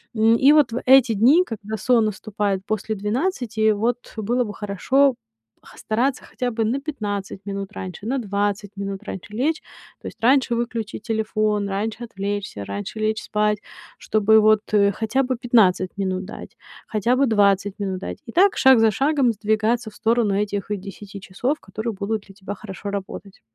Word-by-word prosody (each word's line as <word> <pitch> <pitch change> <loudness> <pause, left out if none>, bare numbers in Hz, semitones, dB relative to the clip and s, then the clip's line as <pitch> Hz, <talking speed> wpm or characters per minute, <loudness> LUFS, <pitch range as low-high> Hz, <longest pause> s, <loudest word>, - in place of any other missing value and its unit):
М, 225 +1 +4
и 270 +4 +6
вот 300 -6 +4
в 235 - -3
эти 260 -2 +7
дни, 255 - +5
когда 220 - -6
сон 235 +1 +3
наступает 205 -2 -2
после 215 +1 -2
12, 220 - 0
вот 230 +4 0 0.2
было 240 +3 0
бы 210 - -6
хорошо, 250 +8 +1 0.5
х - - -16
стараться 250 +5 -1
хотя 250 -1 -3
бы 225 0 -1
на 245 +6 0
15 205 -10 -5
минут 200 0 -5
раньше, 185 0 -7
на 265 +4 -1
20 205 -2 -2
минут 200 0 -5
раньше 205 -1 -8
лечь. 295 +8 0 0.4
То - - -18
есть - - -9
раньше 255 0 +3
выключить 230 -2 -3
телефон, 215 -2 -1
раньше 210 +4 -3
отвлечься, 200 - -4
раньше 100 - -6
лечь 215 0 0
спать, 210 0 +1 0.4
чтобы 220 0 +3
вот, 215 0 +4
э, 200 -1 +4
хотя 220 +6 0
бы 255 0 -1
15 220 -7 +2
минут 185 -1 -2
дать, 205 - -10 0.3
хотя 220 +3 +1
бы 275 - +4
20 205 -3 +2
минут 190 -2 -2
дать. 190 - -6
И - - -7
так 385 +8 +4
шаг 265 -2 +6
за 225 -1 +4
шагом 270 +1 +2
сдвигаться 220 +2 0
в 210 - -19
сторону 225 -3 +1
этих 205 -1 -2
10 200 0 -7
часов, 245 +10 -2
которые 220 +4 -5
будут 210 +1 -3
для 195 - -15
тебя 195 0 -6
хорошо 205 0 -8
работать. 200 0 -7
215 Hz, 175 wpm, -22 LUFS, 200-240 Hz, 0.5 s, эти